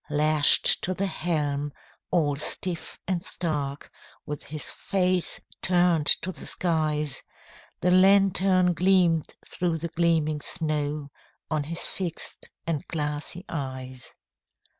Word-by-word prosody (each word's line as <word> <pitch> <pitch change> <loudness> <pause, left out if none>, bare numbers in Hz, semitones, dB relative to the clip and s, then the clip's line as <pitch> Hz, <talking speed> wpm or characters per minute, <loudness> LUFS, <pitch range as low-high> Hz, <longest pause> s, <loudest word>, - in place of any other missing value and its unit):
Lashed 150 0 +4
to 185 - -2
the 195 - -1
helm, 150 -5 -1 0.4
all 150 -5 +1
stiff 165 +4 -1
and 180 -2 0
stark, 145 -6 -2 0.3
With 150 -1 -6
his 155 +1 -3
face 185 -2 0 0.2
turned 175 -4 +2 0.2
to 185 - -2
the 170 - -4
skies, 150 -5 0 0.6
The 180 - +2
lantern 185 -1 +4
gleamed 180 -3 +2
through 175 -2 -1
the 170 +1 -5
gleaming 160 -3 +1
snow 150 -2 -1 0.4
On 155 -2 0
his 165 +3 -2
fixed 175 -4 -4 0.2
and 160 -4 -1
glassy 150 +3 -3
eyes. 130 -4 -6
160 Hz, 115 wpm, -26 LUFS, 150-180 Hz, 0.6 s, Lashed